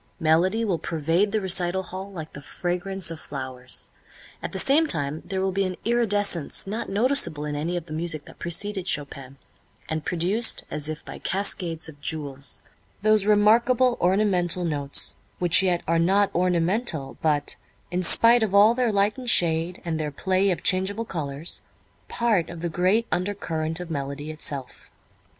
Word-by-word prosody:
Melody 180 +8 +2
will 185 -6 -1
pervade 165 +6 0
the 215 - +1
recital 190 -1 +1
hall 190 +2 -7
like 160 -5 -8
the 140 - -9
fragrance 180 +3 -1
of 165 - -7
flowers. 130 -3 -6 0.5
At - - -5
the - - -5
same 305 +4 +3
time 150 - +2
there 190 -1 -3
will 190 0 0
be 195 +1 0
an 185 -1 -3
iridescence 205 -8 +1
not 210 +4 -4
noticeable 205 - +2
in 150 -1 -3
any 165 +4 -2
of 170 - -5
the 155 - -9
music 155 -2 -3
that - - -15
preceded 190 +3 -3
Chopin, 140 -4 -5 0.5
and 155 -1 -3
produced 185 +9 +2
as 150 0 -3
if 155 +1 -6
by - - -9
cascades 180 -4 -1
of 145 -3 -13
jewels 140 -3 -5 0.4
those 215 -1 +3
remarkable 235 +4 +4
ornamental 180 -2 +2
notes 145 -3 0 0.2
which 175 0 +5
yet 180 -2 0
are 165 +1 +2
not 195 +4 +2
ornamental, 175 - 0
but, 150 -2 0 0.4
in 180 +1 -1
spite 230 +6 +5
of 205 -3 0
all 210 +3 +7
their 245 -2 +1
light 205 +4 +1
and 250 -1 -2
shade, 170 -2 +2
and 160 -2 -2
their 155 -1 -2
play 190 +6 0
of 180 - -2
changeable 195 +4 +2
colors, 150 -3 -3 0.5
part 215 -8 0
of 170 -1 -8
the 170 - -1
great 185 +7 +1
undercurrent 165 -4 -2
of 175 -2 -7
melody 140 +1 -4
itself. 140 -4 -4
175 Hz, 165 wpm, -24 LUFS, 155-200 Hz, 0.5 s, all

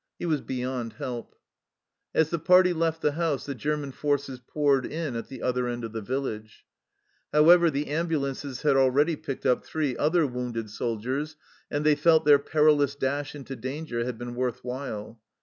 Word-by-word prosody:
He - - -5
was 155 -4 0
beyond 125 -2 -4
help. 125 -5 -6 0.8
As 160 -1 +3
the 170 - 0
party 180 +2 +5
left 165 -1 -1
the 150 - +3
house 155 -2 -1
the 140 - -3
German 145 +2 -2
forces 140 -2 -1
poured 140 +1 +1
in 155 -4 -4
at 115 - -4
the 130 -3 -9
other 125 0 0
end 120 0 -4
of 115 - -5
the 110 - -3
village. 110 -2 -5 0.7
However, 170 +3 +6
the 145 0 -2
ambulances 145 -4 -2
had 145 -2 +4
already 135 +5 +3
picked 135 -2 -6
up 125 - +2
three 150 -5 -2
other 160 +2 +2
wounded 120 -4 -4
soldiers, 125 +8 -3 0.3
and 145 0 -2
they 150 - +6
felt 160 +1 +4
their 145 -1 +7
perilous 150 -1 +3
dash 145 +1 -2
into 135 -2 -7
danger 130 0 -4
had 125 -1 -4
been 120 +1 -6
worth 125 0 -2
while. 120 -4 -6
140 Hz, 175 wpm, -27 LUFS, 125-150 Hz, 0.8 s, their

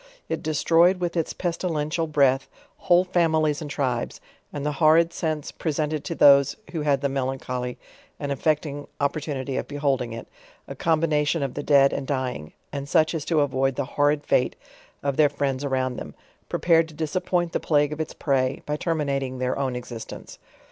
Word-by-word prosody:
It - - -2
destroyed, 170 +4 +3
with' 175 -1 -2
its 165 -2 0
pestilentia; 165 -2 -2
breath, 135 -3 +2 0.3
whole 175 +1 +4
families 160 -4 +1
and 150 - -5
tribes; 130 -4 -2 0.3
and 145 -1 -5
the 150 - +1
horrid 165 +2 +5
scence 155 -3 -2
pre 160 - -2
sentented 150 0 -1
to 170 - -3
those 140 -2 +6
who 165 - -3
had 145 -2 +1
the 140 - +1
melancholy 130 -2 -3 0.4
and 140 -1 -3
effecting 145 0 -1
^opportunity 140 -2 -2
of - - -5
beholding 140 -4 -1
it, 115 0 -7 0.4
a - - -6
combination 155 -1 +1
of 135 - -3
the 145 - -4
dead 140 -2 +4
and 135 -1 -3
dying, 130 - -3 0.2
and 140 0 -5
such 160 +2 +3
as 160 -3 -2
to 160 -3 +2
avoid 135 -1 +1
the 140 - -1
horrid 145 0 +2
fate 125 - +2 0.5
of 140 -1 -1
their 150 -2 +5
friends 140 -1 -2
around 130 -2 -1
them, - - -8 0.3
prepared 165 -1 +3
to 160 - -14
disappoint 175 +2 -1
the - - -1
plague 150 -1 +2
of 155 - -4
its 155 - -5
prey, 135 -2 0
by 150 - -1
terminating 140 -5 -1
their 130 0 -1
own 135 -2 -1
existence. 120 -2 -8
145 Hz, 175 wpm, -24 LUFS, 135-160 Hz, 0.5 s, those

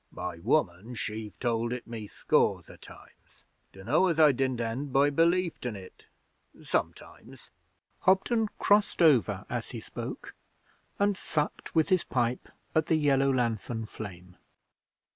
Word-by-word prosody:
'My 90 -2 -6
woman 110 - 0
she've 110 -1 -5
told 115 -1 0
it 125 -1 -4
me 115 -3 -7
scores - - +1
o' - - -13
times. - - -17 0.3
Dunno 120 - +1
as 165 -3 0
I 155 -2 +7
didn't 130 -1 -1
end 120 +5 -3
by 140 +2 +4
belieftin' 165 - +1
it 95 -2 -13 0.6
sometimes.' - - -5 0.5
Hobden 215 +4 +2
crossed 205 -3 +3
over 135 - +3
as - - -4
he - - -6
spoke, - - -7 0.6
and 200 0 +2
sucked 150 -3 -3
with 160 -1 +3
his 185 -2 +3
pipe 120 -1 -1 0.2
at 160 0 +2
the 165 - +3
yellow 140 -3 +3
lanthorn 115 -2 -1
flame. 90 -4 -10
125 Hz, 135 wpm, -29 LUFS, 110-160 Hz, 0.6 s, I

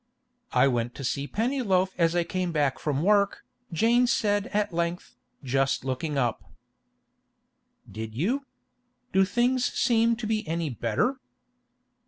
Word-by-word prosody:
'I - - +5
went 120 -1 -1
to 140 - -7
see 140 +3 -2
Pennyloaf 210 - +1
as 165 -1 +2
I 175 - +3
came 180 0 -2
back 145 -4 0
from 150 0 -1
work,' 200 0 +2 0.3
Jane 235 +8 +3
said 205 -3 +1
at 205 -3 -1
length, 170 +1 -3 0.3
just 135 0 0
looking 140 +3 -2
up. 120 -4 0 1.4
'Did 110 0 -7
you? 250 - -1 0.7
Do 190 0 +5
things 245 +4 +1
seem 230 -1 +2
to 230 0 -6
be 215 0 0
any 165 -2 -2
better? 120 - -1
175 Hz, 135 wpm, -27 LUFS, 140-225 Hz, 1.4 s, I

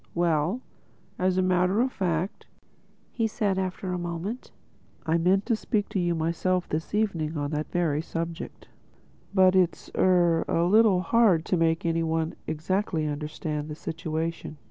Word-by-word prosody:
"Well, 170 +6 +1 0.6
as 185 0 +1
a 185 - +3
matter 185 +2 +2
of 255 +2 +2
fact," 180 -2 -2 0.8
said 205 -3 -1
he - - +1
after 185 0 -3
a 180 - -2
moment, 175 +8 -5 0.6
"I 165 +1 +2
meant 190 +4 +2
to 230 - +2
speak 215 -1 -1
to 195 - -1
you 175 -1 +1
myself 170 +3 0
this 160 +6 -3
evening 165 -8 0
on 145 0 -2
that 150 0 -3
very 160 -4 +1
subject. 165 0 -6 0.6
But 190 -1 +5
it's—er—a 175 -2 +2
little 205 -1 +5
hard 185 -4 +3
to - - +1
make 165 -1 +1
any 165 0 +1
one 160 0 -1
exactly 165 +1 -1
understand 150 0 -4
the 150 - -5
situation. 160 0 -4
175 Hz, 145 wpm, -26 LUFS, 160-190 Hz, 0.8 s, But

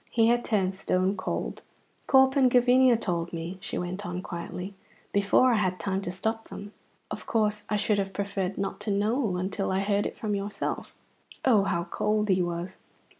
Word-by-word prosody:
He 225 -1 +3
had 240 0 +2
turned 195 -3 +1
stone 190 0 0
cold. 185 - -3 0.5
"Corp 265 0 +5
and 265 -2 +5
Gavinia 250 0 +5
told 170 -5 -2
me," 170 +2 -5
she - - -4
went 180 +3 -4
on 180 -1 -4
quietly, 180 +2 -6 0.4
"before 200 +5 +4
I - - +3
had 185 -3 0
time 190 +3 -1
to 195 - -4
stop 220 +5 -3
them. 205 +1 -9 0.4
Of - - -6
course 210 -2 +1
I 210 - +1
should 205 0 +1
have 195 0 -2
preferred 195 -1 -3
not 195 - -3
to 210 +1 -4
know 210 0 +1
until 190 +2 -2
I 190 +1 +1
heard 200 0 +1
it - - -9
from 215 -2 -2
yourself." 200 +1 -3 0.5
Oh, 220 -7 +5
how 170 -3 0
cold 210 +3 0
he 185 -1 +3
was! 175 +1 -3
200 Hz, 185 wpm, -27 LUFS, 185-215 Hz, 0.5 s, Corp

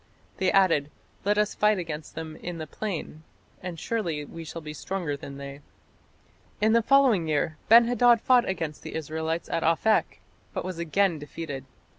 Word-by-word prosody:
They 190 -1 +2
added: 165 -7 +3 0.4
"Let 205 +1 +2
us 210 0 +2
fight 210 0 +3
against 160 -4 -6
them 160 -1 -6
in 175 -1 -6
the 160 - -5
plain, 165 -3 -5 0.4
and 180 -3 -6
surely 170 -10 -2
we 165 +3 -9
shall 165 +1 -7
be 155 -1 -7
stronger 170 -1 -3
than 140 0 -9
they". 140 0 -8 1.0
In 215 +1 +3
the 230 - +5
following 245 -9 +4
year 155 +1 0
Ben 230 +1 +9
hadad 245 -1 +5
fought 245 -1 +4
against 165 -5 -3
the - - -8
Israelites 160 +1 -3
at - - 0
Aphek, 165 +7 +2 0.4
but - - -2
was 185 -2 -5
again 170 0 +1
defeated. 145 -2 -6
165 Hz, 170 wpm, -27 LUFS, 155-210 Hz, 1.0 s, Ben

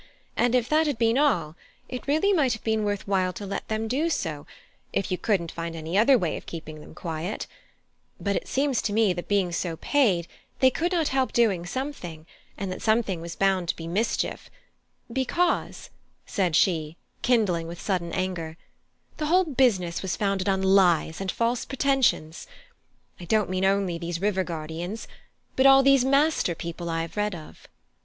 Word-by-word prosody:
And 245 +1 +2
if 245 -2 +2
that 310 +2 +3
had 285 -5 -1
been 230 +2 +2
all, 170 - +1 0.3
it 250 +1 -7
really 315 +8 +3
might 280 - +3
have 220 - -7
been 220 -1 0
worth 205 -1 -2
while 185 -2 +1
to 205 - -7
let 200 - -4
them 220 0 -2
do 285 +8 0
so, 155 - -3 0.4
if 195 - -2
you 185 - 0
couldn't 185 -7 0
find 165 0 -5
any 160 +2 -5
other 235 +6 +6
way 175 -8 -1
of - - -11
keeping 155 -2 -8
them - - -13
quiet; 170 +4 -4 0.7
but 200 -1 -1
it - - -3
seems 275 -2 +1
to 205 - -2
me 215 -3 +3
that 175 0 -6
being 195 -3 +1
so 170 -1 -2
paid, 195 - +2 0.3
they 260 0 +5
could 340 +7 -1
not 335 -4 +1
help 265 -1 +1
doing 195 -7 +2
something, 180 - -5 0.3
and 195 -2 -4
that 185 - -6
something 215 -6 +1
was 170 0 -7
bound 190 -3 +1
to - - +1
be 165 - -8
mischief, 200 +8 -2 0.6
because," 340 +8 -1 0.3
said 180 -6 0
she, 160 -3 +1 0.2
kindling 200 -9 +2
with 170 +1 -8
sudden 180 -4 -2
anger, 175 -4 -3 0.6
"the 305 - -2
whole 365 +4 +4
business 230 - +1
was 190 -1 -2
founded 195 -1 0
on 190 0 +1
lies 185 -4 +3
and 195 - -1
false 235 +1 0
pretensions. 270 - 0 0.7
I 175 - -8
don't 210 +1 +1
mean 185 +1 0
only 195 -3 +1
these 170 0 -4
river 190 -1 +1
guardians, 170 +5 -5 0.5
but 260 +1 +5
all 270 0 +7
these 275 -1 +5
master 275 - +2
people 170 +1 -6
I 165 0 -1
have 165 - -9
read 210 -2 0
of." 155 -2 -12
195 Hz, 180 wpm, -26 LUFS, 170-250 Hz, 0.7 s, all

